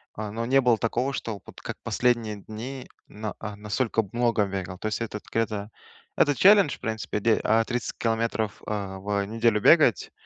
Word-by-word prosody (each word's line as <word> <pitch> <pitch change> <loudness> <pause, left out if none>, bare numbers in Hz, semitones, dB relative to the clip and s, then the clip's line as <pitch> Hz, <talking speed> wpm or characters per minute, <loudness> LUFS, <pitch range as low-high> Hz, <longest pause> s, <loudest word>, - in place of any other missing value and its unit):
а, 105 -1 -5
но 115 +2 -3
не 135 +2 +4
было 120 -3 +3
такого, 120 +5 -1
что 110 -6 -4
вот - - -13
как - - -6
последние 115 -4 0
дни 120 +6 -8 0.2
на 105 0 -6
а, 105 -1 -6
настолько 110 +2 -1
много 115 -3 +2
бегал. 95 -2 -5
То 110 - -4
есть 110 - -2
это 105 -2 -4
где-то 110 -2 -1 0.5
это 145 -1 +4
челлендж, 200 -5 +6
в - - -34
принципе, 110 -2 -3
д 115 0 +3
а, 110 +1 +3
30 120 -2 -3
километров, 115 -2 -1
э, - - -5 0.3
в 100 +1 -1
неделю 115 0 +1
бегать, - - +5
110 Hz, 180 wpm, -26 LUFS, 105-120 Hz, 0.5 s, челлендж